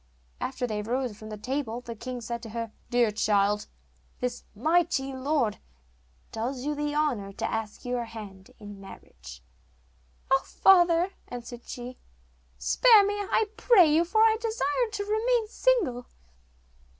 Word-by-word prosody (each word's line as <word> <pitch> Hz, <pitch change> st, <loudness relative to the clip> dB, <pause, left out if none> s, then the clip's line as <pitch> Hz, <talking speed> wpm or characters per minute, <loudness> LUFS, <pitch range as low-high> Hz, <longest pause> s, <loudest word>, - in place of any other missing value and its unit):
After 260 Hz, -1 st, -3 dB
they 215 Hz, -3 st, -3 dB
arose 245 Hz, +1 st, -2 dB
from 215 Hz, +1 st, -11 dB
the 215 Hz, -, -6 dB
table 245 Hz, +1 st, -3 dB
the 235 Hz, -1 st, -7 dB
king 250 Hz, +2 st, -6 dB
said 235 Hz, 0 st, -5 dB
to 225 Hz, -, -9 dB
her, 230 Hz, 0 st, -5 dB, 0.2 s
'Dear 240 Hz, -3 st, +3 dB
child, 210 Hz, -1 st, +1 dB, 0.5 s
this 250 Hz, -1 st, -3 dB
mighty 295 Hz, +1 st, +1 dB
lord 260 Hz, -4 st, 0 dB, 0.7 s
does 250 Hz, +4 st, -4 dB
you 300 Hz, -, 0 dB
the 295 Hz, 0 st, -2 dB
honour 250 Hz, -10 st, 0 dB
to -, -, -4 dB
ask 220 Hz, 0 st, -4 dB
your 245 Hz, -1 st, -2 dB
hand 205 Hz, -4 st, -10 dB
in 205 Hz, -2 st, -10 dB
marriage.' -, -, -12 dB, 0.9 s
'Oh, 270 Hz, 0 st, +5 dB
father,' 350 Hz, -1 st, +4 dB, 0.2 s
answered 240 Hz, 0 st, -8 dB
she, 250 Hz, +1 st, -8 dB, 0.6 s
'spare 425 Hz, -, +5 dB
me, 405 Hz, -, 0 dB
I 410 Hz, +1 st, 0 dB
pray 385 Hz, -10 st, +5 dB
you, 325 Hz, +2 st, +4 dB
for 375 Hz, +6 st, +1 dB
I 445 Hz, 0 st, +5 dB
desire 445 Hz, -, 0 dB
to 410 Hz, -1 st, -3 dB
remain 445 Hz, +2 st, +1 dB
single. 405 Hz, -, +1 dB
255 Hz, 145 wpm, -27 LUFS, 220-345 Hz, 0.9 s, Oh